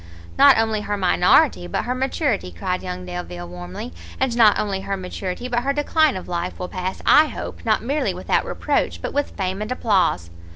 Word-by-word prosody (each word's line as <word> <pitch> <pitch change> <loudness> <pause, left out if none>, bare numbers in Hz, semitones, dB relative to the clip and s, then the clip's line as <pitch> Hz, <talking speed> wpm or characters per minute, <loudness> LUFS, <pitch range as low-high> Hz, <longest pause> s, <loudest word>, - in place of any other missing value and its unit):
"Not - - +7
only 220 -1 +1
her 205 0 -2
minority, 180 - +3
but - - -2
her 250 - -2
maturity," 255 - -1
cried 180 - -3
young 180 0 -6
Delvile, 175 - -6
warmly, 90 -1 -8 0.3
"and 260 -3 0
not 220 -3 +5
only 195 -2 -2
her 195 0 -3
maturity, 185 +4 -5
but 240 -1 0
her 275 +3 0
decline 295 -2 +2
of 185 - -8
life 175 0 -3
will 180 - -5
pass, 185 0 -4
I 310 +1 +6
hope, - - -7
not 220 -1 +2
merely 285 +5 0
without - - 0
reproach, - - -1
but - - -5
with 285 0 -2
fame 190 +1 -2
and 215 +3 -4
applause!" 190 - +1
195 Hz, 195 wpm, -22 LUFS, 180-245 Hz, 0.3 s, Not